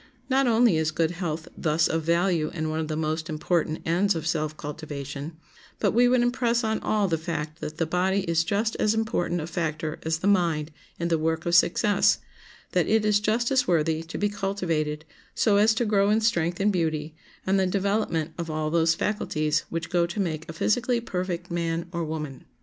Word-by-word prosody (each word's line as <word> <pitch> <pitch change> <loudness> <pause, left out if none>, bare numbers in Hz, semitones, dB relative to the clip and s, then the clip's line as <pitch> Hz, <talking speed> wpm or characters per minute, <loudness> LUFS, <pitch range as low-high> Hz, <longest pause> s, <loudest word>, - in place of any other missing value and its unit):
Not 270 0 +3
only 230 -6 +4
is 160 0 +1
good 160 +1 0
health 165 -3 -4
thus 155 0 +1
of 160 - -1
value 170 -1 +1
and 155 -1 -2
one 155 - -2
of 160 - -2
the 155 - -3
most 155 +2 -2
important 160 0 -1
ends 180 +4 +2
of 160 -1 -4
self 155 -1 -1
cultivation, 145 0 -6 0.4
but - - +1
we 245 +1 +4
would 245 -1 +3
impress 240 -1 +1
on 220 0 0
all 210 -2 +1
the 165 -3 0
fact 160 -1 -4
that 155 +1 -5
the 165 - +1
body 185 +4 +1
is 165 -3 +1
just 205 +6 0
as 215 +1 +2
important 175 -6 -1
a - - -4
factor 155 -2 -3
as 160 0 -1
the 175 - -6
mind 165 -6 +2 0.3
in 170 0 -1
the 165 -2 +2
work 160 +1 -1
of 170 - -1
success, 195 +3 +4 0.5
that - - +1
it 220 -1 +2
is 210 -1 +4
just 225 +4 0
as 255 -2 +2
worthy 160 -2 +1
to 165 +1 -7
be 205 - +1
cultivated, 170 -7 -2 0.3
so 205 -2 +3
as 215 +2 +4
to 240 - +1
grow 200 -2 +3
in 215 +1 +3
strength 175 -6 +1
and 205 +1 +2
beauty, 160 -3 -1 0.3
and 195 +1 +2
the 190 - +2
development 195 -5 0
of 170 -1 -3
all 155 0 -2
those 165 0 +3
faculties 155 -7 -1
which 165 -1 -4
go 175 -1 +2
to 170 +5 -5
make 165 -3 -2
a - - -5
physically 240 +8 +1
perfect 180 -5 -4
man 170 -1 -1
or 170 -2 -2
woman. 150 -4 -5
170 Hz, 205 wpm, -26 LUFS, 160-205 Hz, 0.5 s, only